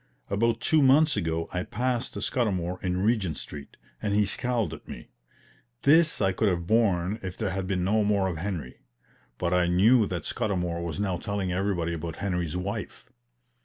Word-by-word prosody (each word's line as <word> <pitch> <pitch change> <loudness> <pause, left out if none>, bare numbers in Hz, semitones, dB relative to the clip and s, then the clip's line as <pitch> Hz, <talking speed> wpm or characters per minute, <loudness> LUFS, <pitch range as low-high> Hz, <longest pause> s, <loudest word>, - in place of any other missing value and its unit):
About 115 +3 +1
two 155 +4 +3
months 145 +3 +5
ago 80 -4 -1
I 90 - -1
passed 125 +5 -2
Scudamour 90 -7 -1
in 90 0 0
Regent 105 -8 +1
Street, 70 -1 -8 0.2
and 100 -1 0
he 105 0 +4
scowled 120 +2 -1
at - - -11
me. - - -9 0.7
This 160 +2 +4
I 95 -2 +2
could 105 +3 +1
have 85 -2 -1
borne 100 -1 +2
if 95 -1 -6
there 105 -4 -1
had 95 -1 -3
been 90 -2 0
no 105 +3 +2
more 100 -2 +2
of 90 -4 -3
Henry; 85 -7 -5 0.6
but 90 0 -1
I 90 -1 +3
knew 105 +6 +4
that 85 -5 -4
Scudamour 90 -7 -1
was 85 +2 -4
now 95 -3 0
telling 100 -2 -3
everybody 90 -3 -1
about 85 0 -5
Henry's 90 -4 -2
wife. 105 +6 -5
95 Hz, 175 wpm, -27 LUFS, 90-110 Hz, 0.7 s, months